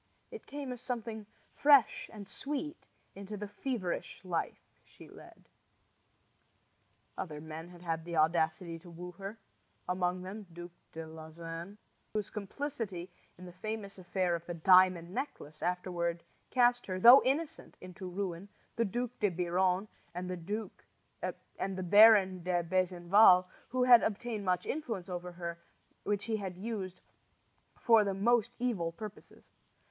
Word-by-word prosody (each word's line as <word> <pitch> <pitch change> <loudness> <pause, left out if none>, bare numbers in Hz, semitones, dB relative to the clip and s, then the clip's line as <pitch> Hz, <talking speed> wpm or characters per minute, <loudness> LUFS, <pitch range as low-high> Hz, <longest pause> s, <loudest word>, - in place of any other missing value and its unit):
It 455 - -10
came 280 -2 -5
as 250 -1 -6
something 225 -4 -4 0.3
fresh 285 -4 +4
and 205 -3 -9
sweet 295 - -5 0.3
into 200 +2 -7
the 210 +1 -5
feverish 205 -5 -4
life 175 -3 -2 0.3
she - - -16
led. - - -15 1.7
Other 155 -5 -4
men 160 +2 -8
had 175 0 -14
had 165 -1 -2
the 170 0 -5
audacity 160 +1 +1
to 175 - -14
woo 175 +1 -8
her 200 +3 -6 0.5
among 180 0 0
them 200 +2 -7
Duc 175 +1 -9 0.2
de 160 0 -6
Lauzun, 165 +4 -8 0.4
whose 215 -1 -2
complicity 205 -5 -5 0.3
in 180 - -11
the 180 - -9
famous 200 +1 -6
affair 180 0 0
of 170 -1 -2
the 175 - -4
diamond 180 0 +5
necklace 155 - -5
afterward 175 -1 -1 0.3
cast 245 -1 +3
her, 185 -1 -2
though 240 +7 +10
innocent, 310 +4 -2
into 185 +1 -8
ruin; 185 0 -4 0.3
the 230 - +2
Duc 240 +4 -2
de 205 - +3
Biron; 180 +2 +1 0.3
and 180 +1 -4
the 190 0 -6
Baron 200 -1 +7
de 175 0 0
Besenval, 185 +2 +5 0.2
who 255 0 +1
had 245 -2 +8
obtained 220 0 -2
much 180 -1 +1
influence 225 - -4
over 180 0 -5
her, 170 -1 -5 0.4
which 205 0 -1
he 220 -1 -1
used 185 -1 -5 0.8
for 225 -3 +5
the 200 -1 -1
most 225 +3 +2
evil 220 -10 -1
purposes. 210 +4 -11
185 Hz, 135 wpm, -32 LUFS, 175-220 Hz, 1.7 s, though